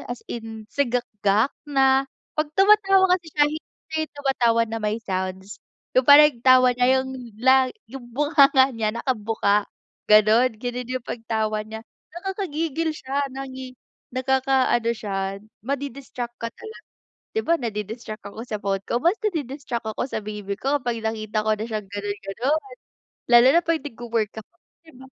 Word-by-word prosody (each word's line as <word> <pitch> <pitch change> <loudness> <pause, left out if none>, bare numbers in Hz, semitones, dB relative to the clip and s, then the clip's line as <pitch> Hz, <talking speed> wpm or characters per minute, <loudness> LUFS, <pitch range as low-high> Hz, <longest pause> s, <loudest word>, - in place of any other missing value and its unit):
as 245 0 -6
in 225 -2 -7
sigakgak 235 -4 +1 0.2
na 270 -1 +3 0.2
kapag 305 -1 -1
tumatawa 390 -1 +5
kasi 350 -2 0
siya 295 - +6
hindi 315 0 -9
'yung 315 - -4
tumatawa 245 -5 +2
na 225 0 -5
may 210 +1 -1
sounds. 190 +1 -4 0.3
'Yung 255 +1 +2
parang 295 +1 +9
yung 235 - -20
tawa 255 0 +6
niya 245 0 +1
'yung 260 0 -1 0.3
la 260 +2 +4 0.2
'yung 250 +2 -10
bunganga 285 -2 +5
niya 225 -1 -2
nakabuka, 215 -4 0 0.4
ganun 215 +3 +5
ganun 245 +1 -5
'yung 255 -1 -4
pagtawa 220 -2 -2
niya. 220 +1 -8 0.3
Nakakagigil 330 -4 -3
siya 275 +1 -2
nangi 260 -1 -8 0.4
nakakaano 260 -2 +1
siya 195 -2 -3 0.3
madi-distract 265 -3 -5
ka 230 - -2
talaga, 440 - -12 0.4
'di 445 - 0
ba 335 +1 +3
nadi-distract 215 -2 -6
ako 220 +3 -8
sa 215 -4 -5
phone 195 0 -2
ko, 240 - -1
mas 345 - +2
nadi-distract 275 - -3
ako 215 - -3
sa 250 - -4
baby 210 -1 -6
ko 280 +2 +1
kapag 240 -2 -3
nakita 215 -1 -2
ko 215 0 +1
na 215 - -4
siyang 215 -3 -5
ganun-ganon. 205 +8 -3 0.5
Lalo 240 0 +7
na 340 - +5
kapag 330 -3 -1
nagwo-work 230 -5 -3
ako 215 - -16 0.3
'di 320 - -16
ba, 260 - -13
245 Hz, 150 wpm, -23 LUFS, 220-275 Hz, 0.5 s, parang